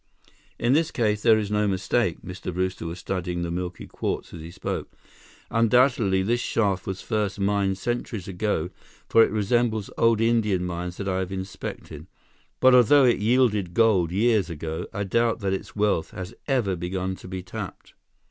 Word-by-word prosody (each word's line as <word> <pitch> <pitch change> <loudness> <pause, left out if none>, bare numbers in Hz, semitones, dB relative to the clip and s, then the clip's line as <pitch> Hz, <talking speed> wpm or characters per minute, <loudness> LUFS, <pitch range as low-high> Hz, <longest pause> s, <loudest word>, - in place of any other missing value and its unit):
"In 120 +2 +2
this 160 +2 +3
case, 105 -3 0
there 110 0 +5
is 105 -1 -2
no 105 0 +2
mistake." 95 -1 0
Mr. 90 0 -6
Brewster 90 -1 -2
was 85 +1 -5
studying 90 -1 -3
the 85 - -3
milky 90 +1 -4
quartz - - -4
as 85 - -8
he 80 - -8
spoke. 90 +1 -5 0.6
"Undoubtedly, 115 -4 +3
this 120 +5 +1
shaft 100 -6 0
was 95 0 -4
first 105 -3 -1
mined 100 -1 +1
centuries 120 -4 -3
ago, 95 -3 -2 0.4
for 115 - +6
it - - +2
resembles 110 0 0
old 115 -1 +4
Indian 110 -5 +2
mines 90 0 -4
that 100 - -4
I 95 -1 0
have 95 0 -3
inspected. 95 -4 -7 0.5
But 130 0 +6
although 125 +3 +6
it 120 - +3
yielded 105 -5 +2
gold 100 -7 +3
years 105 -1 +2
ago, 80 0 -5
I 100 - -3
doubt 115 +4 +1
that 95 -1 0
its 95 - -5
wealth 105 -6 +1
has 95 0 -7 0.2
even 105 -10 +1
begun 95 +2 -3
to - - -12
be 95 0 -5
tapped." 90 - -8
100 Hz, 175 wpm, -25 LUFS, 90-115 Hz, 0.6 s, for